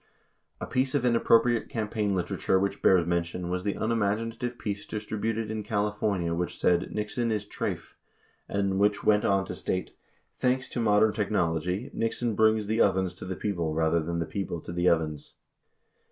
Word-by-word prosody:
37 - - -4
A - - -14
piece 130 +1 +1
of 125 - +1
inappropriate 115 0 +3
campaign 105 -4 -1
literature 95 +1 0
which 100 +1 -2
bears 90 -3 +5
mention 85 +1 -2
was 90 0 -2
the 100 0 -1
unimaginative 115 +2 -1
piece 105 -3 -4
distributed 110 +1 -3
in 110 0 -3
California 105 -4 -1
which 85 +1 -2
said 90 0 +2
"Nixon 110 +3 -1
is 105 -2 -1
treyf," - - -4 0.6
and 100 -1 0
which 105 0 +2
went 105 -1 +3
on 95 -1 +2
to - - -5
state: 90 - -3 0.4
"Thanks 130 0 +1
to - - -3
modern 110 -1 +4
technology 95 - -1
Nixon 115 0 -1
brings 110 0 +3
the 110 +2 +1
ovens 95 -2 +2
to 90 - -9
the 95 - -4
people 85 -7 -2
rather 80 +1 +2
than 85 +2 -3
the 85 - -1
people 85 +1 -4
to - - -8
the 85 +1 +3
ovens." 80 -3 -1
105 Hz, 170 wpm, -28 LUFS, 90-110 Hz, 0.6 s, bears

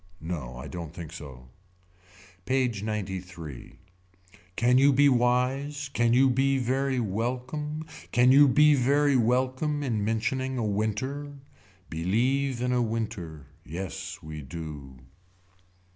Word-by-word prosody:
No 75 -7 -5
I 65 +4 -7
don't 85 -1 -7
think 80 -2 -8
so. 65 -7 -10 1.0
PAGE 125 -3 0
XCIII. 95 - -6 0.8
Can 125 +5 +4
you 140 +1 +6
be 140 +1 +5
wise. 135 +3 +1
Can 120 -2 +2
you 130 +3 +5
be 135 +2 +2
very 130 +1 0
welcome. 125 +8 -3 0.3
Can 125 +1 +5
you 145 +2 +8
be 150 +3 +5
very 140 +2 +3
welcome 130 +5 +1
in 115 -6 -1
mentioning 130 +5 -1
a 115 - -1
winter. 110 +8 -2 0.6
Believe 120 +10 0
in 125 0 +1
a 125 - +2
winter. 110 - -4 0.2
Yes 90 +4 -6
we 80 -1 -7
do. 75 -3 -8
120 Hz, 120 wpm, -27 LUFS, 90-135 Hz, 1.0 s, you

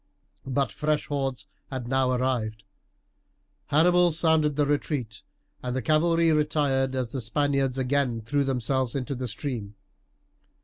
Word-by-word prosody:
But 135 -3 0
fresh 150 +8 -1
hordes 135 -3 -2 0.2
had 130 -3 -5
now 130 0 +2
arrived; 120 -4 -1 1.0
Hannibal 175 +3 +4
sounded 160 -2 +2
the 145 0 +2
retreat, 140 -5 -2 0.4
and 125 0 -3
the 130 - -1
cavalry 165 +2 +3
retired 145 -3 +1
as 125 -3 -2
the 135 - -3
Spaniards 135 +2 0
again 130 -3 0
threw 140 +6 0
themselves 130 -1 0
into 140 +1 -2
the 130 -1 -4
stream. 110 -3 -5
135 Hz, 130 wpm, -26 LUFS, 125-150 Hz, 1.0 s, Hannibal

